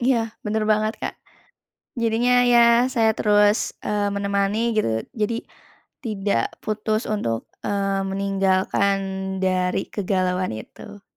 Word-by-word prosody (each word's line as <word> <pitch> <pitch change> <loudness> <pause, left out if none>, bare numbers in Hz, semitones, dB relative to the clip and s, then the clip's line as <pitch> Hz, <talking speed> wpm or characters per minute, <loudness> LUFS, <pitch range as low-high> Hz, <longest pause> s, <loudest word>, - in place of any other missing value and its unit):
Iya, 245 0 +3 0.3
bener 215 0 0
banget, 215 +1 +2
Kak. - - -3 0.9
Jadinya 230 +2 +2 0.2
ya, 240 - +6 0.3
saya 225 -2 +3
terus, 210 0 +3
eee, 205 -1 0
menemani 200 +1 0 0.2
gitu, 215 - +1 0.3
jadi 215 +1 0 0.7
tidak 200 - 0 0.2
putus 215 +1 -1
untuk, 115 - -2 0.2
eee, 195 -1 0
meninggalkan 195 0 +1 0.4
dari 185 0 +1
kegalauan 185 - -1
itu. 205 - -11
205 Hz, 110 wpm, -23 LUFS, 195-215 Hz, 0.9 s, ya